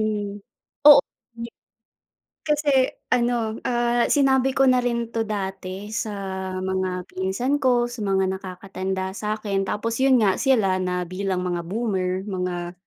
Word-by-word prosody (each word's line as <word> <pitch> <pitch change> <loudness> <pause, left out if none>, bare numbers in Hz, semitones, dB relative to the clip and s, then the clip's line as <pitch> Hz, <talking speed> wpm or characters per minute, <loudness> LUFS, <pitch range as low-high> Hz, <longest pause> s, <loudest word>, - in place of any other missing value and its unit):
'di. 205 -1 -2 2.1
Kasi 300 -1 +1 0.4
ano, 235 -2 0
ah, 240 0 +1
sinabi 270 -2 +3
ko 270 - +3
na 255 0 +4
rin 235 -1 -1
'to 230 -1 -2
dati 195 -1 -5
sa 215 0 -2 0.5
mga 185 -1 -2
pinsan 195 +10 -1
ko, 245 -2 +3
sa 240 -2 -7
mga 190 -1 +2
nakakatanda 190 0 -5
sa'kin, 210 -2 -2
tapos 225 +3 -2
yun 265 -1 +5
nga 195 -3 +4
sila 220 -9 +2
na 180 -1 -1
bilang 185 0 -2
mga 175 -1 -1
boomer, 190 -2 -2
mga, 180 -3 -3
205 Hz, 125 wpm, -23 LUFS, 190-240 Hz, 2.1 s, yun